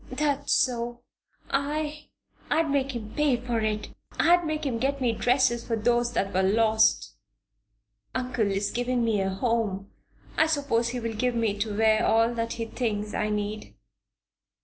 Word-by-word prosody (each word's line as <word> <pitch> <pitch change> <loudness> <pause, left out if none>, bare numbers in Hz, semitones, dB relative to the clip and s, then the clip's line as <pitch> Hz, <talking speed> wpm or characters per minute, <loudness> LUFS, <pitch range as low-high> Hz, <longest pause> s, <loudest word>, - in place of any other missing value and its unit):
"That's 285 +1 -1
so. 240 -1 0 0.5
I 300 +2 -2 0.4
I'd 315 0 +1
make 275 -2 0
him 215 -2 -6
pay 295 -4 +2
for 240 -1 -2
it! 215 -1 -2 0.3
I'd 350 +1 +5
make 310 -1 -2
him 240 -4 -1
get 275 +3 0
me 250 -3 +1
dresses 245 0 +2
for 230 - -1
those 240 +2 +1
that 195 -4 -1
were 190 - +2
lost." 220 +3 +3 1.0
"Uncle 250 -4 0
is 195 +1 -1
giving 245 0 0
me 215 -3 +1
a 190 - 0
home; 200 -1 -1 0.5
I 315 - +5
suppose 280 -7 0
he 250 +1 -3
will 230 -1 -3
give 245 +3 0
me 225 -3 0
to 205 -1 -2
wear 220 0 +3
all 230 +1 +3
that 230 0 -2
he 230 - -4
thinks 215 -3 -3
I 215 - -1
need. 210 0 -4
235 Hz, 165 wpm, -26 LUFS, 215-260 Hz, 1.0 s, I'd